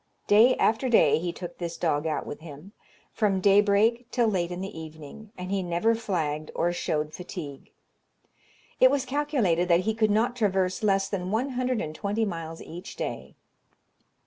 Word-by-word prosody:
Day 225 +5 +6
after 230 +4 +1
day 230 - +5
he 175 +1 -2
took 175 0 -9
this 170 -1 -4
dog 160 -2 0
out 155 - -2
with - - -7
him, 155 +4 -11 0.4
from 205 -4 +1
day 200 +1 +5
break 225 +4 +2
till 240 -2 +1
late 180 -5 0
in 180 0 -5
the 195 +2 -6
evening, 160 +7 -10
and 180 +1 -6
he 200 -1 0
never 175 +6 +1
flagged 160 -9 -2
or 175 +1 +1
showed 155 -3 -2
fatigue. 155 -5 -8 1.1
It 255 - +7
was 275 -1 0
calculated 255 - +1
that 170 0 +4
he 220 +4 0
could 215 -1 +1
not 230 +4 +1
traverse 190 -5 0
less 195 -2 +2
than 185 -2 -3
one 230 +7 0
hundred 255 -2 -1
and 155 - -5
twenty 210 +5 -1
miles 165 -4 -6
each 175 +2 -9
day. - - -5
195 Hz, 175 wpm, -26 LUFS, 170-220 Hz, 1.1 s, It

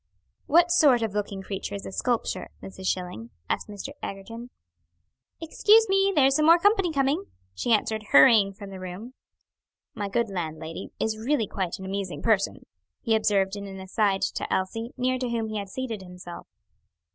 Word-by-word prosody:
"What 345 +3 +5
sort 285 -9 +5
of 220 -3 -2
looking 200 -2 -3
creature 195 +1 -5
is 200 - -7
a - - -6
sculpture, 225 -3 -2
Mrs. 190 -1 -7
Schilling?" 180 -12 -3 0.2
asked - - -2
Mr. 205 -2 -7
Egerton. 230 +5 -7 0.9
"Excuse 425 +7 +4
me; 390 0 +3
there's 275 -2 +4
some 305 0 +3
more 335 +1 +8
company 390 -1 +3
coming," 285 +6 0 0.3
she 95 - -2
answered, 220 0 +1
hurrying 195 +8 +7
from 195 0 -10
the 190 - -8
room. 185 +7 -8 0.8
"My 205 -1 -4
good 235 +3 0
landlady 165 -1 -5
is 220 -1 -1
really 240 0 +1
quite 190 -4 -3
an 190 - -9
amusing 190 -1 -4
person," 215 -4 +1 0.4
he 230 - +1
observed 200 -2 +1
in 200 0 -6
an 195 -1 -8
aside 195 +1 0
to - - -2
Elsie, 225 +6 -2
near 255 0 0
to 250 -1 -2
whom 230 -2 -2
he 215 -1 -3
had 200 -1 -6
seated 230 -2 -4
himself. 180 -1 -10
210 Hz, 170 wpm, -26 LUFS, 190-255 Hz, 0.9 s, more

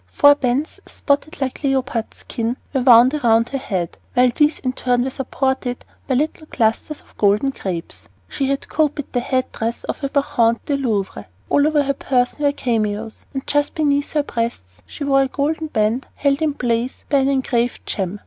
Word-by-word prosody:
Four 285 - +6
bands, 275 +2 -1
spotted 290 +2 -1
like 265 +3 -3
a - - +2
leopard's 255 -4 -1
skin, 230 +2 -3 0.2
were 265 - +1
wound 245 +1 +7
about 230 -5 +3
her 275 - -3
head, 185 -9 -3 0.2
while 250 -1 +5
these 300 0 +3
in 255 -1 -2
turn 245 -1 +1
were 265 - -2
supported 265 -1 -2 0.2
by 260 - +1
little 310 +3 -1
clusters 230 +6 -1
of - - -25
golden 210 +6 +3
grapes. 180 -9 -6 0.2
She 275 - -2
had 275 0 -2
copied 295 -2 -1
the 245 - +2
head 255 +1 -1
dress 230 +1 -3
of - - -5
a 275 - 0
Bacchante 235 -5 +1
in 275 - 0
the 265 - -1
Louvre. 200 - -2 0.2
All 285 +1 +4
over 305 -2 +2
her 280 0 0
person 260 +2 0
were 285 - +4
cameos, 220 -4 -2
and 265 - -3
just 290 0 0
beneath 285 -2 +1
her 300 -2 +2
breasts 230 - -4
she 295 - -7
wore 275 -1 +3
a 270 - +2
golden 305 +4 -1
band 225 -1 0
held 280 +1 +1
in 305 -2 +1
place 240 0 -1
by 280 - +3
an 270 0 +2
engraved 250 -3 0
gem. 195 +1 -3
260 Hz, 195 wpm, -20 LUFS, 230-285 Hz, 0.2 s, wound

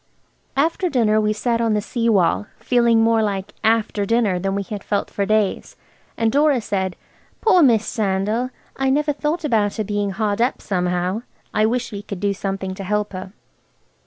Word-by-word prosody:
After 330 +5 +1
dinner 215 -6 +2
we 210 0 +1
sat 230 +2 0
on 225 -2 +2
the - - +2
sea 230 +2 -1
wall, 200 0 +2
feeling 235 -2 +3
more 225 0 +3
like 195 -3 -2
after 220 -2 +2
dinner 210 -3 +1
than 195 +1 -1
we 200 - -1
had 205 0 -6
felt 205 - -2
for 200 -1 -1
days, 215 -2 0 0.4
and 225 -1 +2
Dora 290 -1 +3
said– 190 -4 -2 0.4
"Poor 400 -5 +4
Miss 230 -7 +4
Sandal! 210 +4 -1 0.3
I 270 0 0
never 295 +2 +2
thought 305 +4 -2
about 215 -8 +1
her 215 - -1
being 205 0 -1
hard 205 +1 -1
up, 245 +3 +1
somehow. 180 +2 -1 0.3
I 215 +1 +3
wish 245 +2 -1
we 200 -1 -5
could 200 -2 -7
do 200 +1 0
something 195 -1 -4
to 195 +1 -7
help 210 +1 -1
her." 185 0 -6
215 Hz, 185 wpm, -21 LUFS, 200-235 Hz, 0.4 s, Poor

